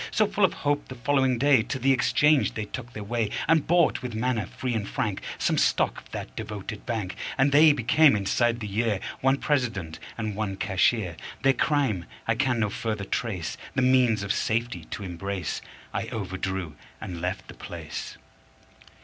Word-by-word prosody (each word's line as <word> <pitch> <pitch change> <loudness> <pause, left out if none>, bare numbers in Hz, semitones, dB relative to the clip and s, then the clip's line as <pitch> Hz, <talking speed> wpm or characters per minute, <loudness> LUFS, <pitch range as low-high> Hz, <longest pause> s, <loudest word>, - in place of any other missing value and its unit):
So, 215 - +3
full 205 0 -1
of 190 - +4
hope, 145 0 +1
the 130 - -8
following 130 +1 +2
day 140 -1 +5
To 135 - -3
the 135 +2 +3
exchange 145 +3 +3
they 110 - -2
took 120 +3 -7
their 105 - -6
way 115 0 -1 0.2
And 160 -2 +3
bought, 170 -1 +3
with 125 -4 -5
manner 115 -3 0
free 125 -2 -3
and 105 -3 -2
frank, 110 -8 -2 0.2
Some - - +1
stock - - +2
of - - -21
that - - -7
devoted 105 0 -6
bank; 110 -6 -2 0.2
And 135 +1 +4
they 150 +2 +8
became, 145 +1 +5
inside 115 +4 +1
the 105 - -3
year, 105 0 0 0.2
One 135 +1 +3
President 115 - -1 0.2
and 110 -2 -2
one 100 -2 -2
Cashier. 95 -2 +1 0.3
Their 135 -1 +5
crime 130 - +1 0.2
I 115 - +3
can 125 0 +1
no 105 -2 +1
further 110 -2 -3
trace 95 -7 -3 0.2
The 130 - +2
means 125 -5 +4
of 100 - 0
safety 115 -7 -1
to 100 - -6
embrace, 95 0 -4 0.3
I - - -2
overdrew 95 -4 -3 0.3
and 85 -2 -6
left 90 +2 -3
the - - -10
place. - - -7
115 Hz, 180 wpm, -26 LUFS, 100-130 Hz, 0.3 s, they